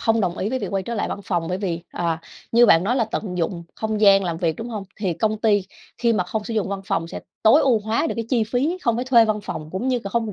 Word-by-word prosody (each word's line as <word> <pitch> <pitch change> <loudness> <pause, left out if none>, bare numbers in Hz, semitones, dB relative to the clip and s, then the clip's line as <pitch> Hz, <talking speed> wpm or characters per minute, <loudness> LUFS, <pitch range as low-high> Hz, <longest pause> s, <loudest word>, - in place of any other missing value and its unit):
hông 225 0 +2
đồng 180 -2 -1
ý 200 - -1
với 260 - -1
việc 200 -5 -4
quay 195 -1 -1
trở 235 +4 -4
lại 205 - -1
văn 200 - -4
phòng, 175 -3 -1
bởi 180 +1 -2
vì, 175 -4 -2
ờ, 170 -2 -1 0.4
như 240 +1 +6
bạn 165 -1 +5
nói 245 +5 +1
là 230 - +2
tận 200 -4 -4
dụng 170 0 -2
không 220 -1 -2
gian 195 -2 +6
làm 170 -2 -2
việc, 165 -3 0
đúng 230 +2 -6
hông? 210 -4 -5 0.2
Thì 190 -5 0
công 215 +5 0
ty 210 -3 +3 0.4
khi 235 -1 +2
mà 180 -5 +1
không 210 +4 -3
sử 230 - -4
dụng 205 -3 0
văn 200 -1 -3
phòng 165 -2 -1
sẽ - - -6 0.2
tối 250 +8 +6
ưu 245 -5 +4
hóa 220 +9 0
được - - -2
cái 230 - -2
chi 235 -4 +2
phí, 275 +11 -1
không 235 -2 +1
phải 245 - -2
thuê 235 -3 +6
văn 215 -1 -1
phòng 155 -4 -6
cũng 200 +8 -2
như 255 -2 +2
c - - -13
hông 225 -3 -1
215 Hz, 300 wpm, -22 LUFS, 185-230 Hz, 0.4 s, như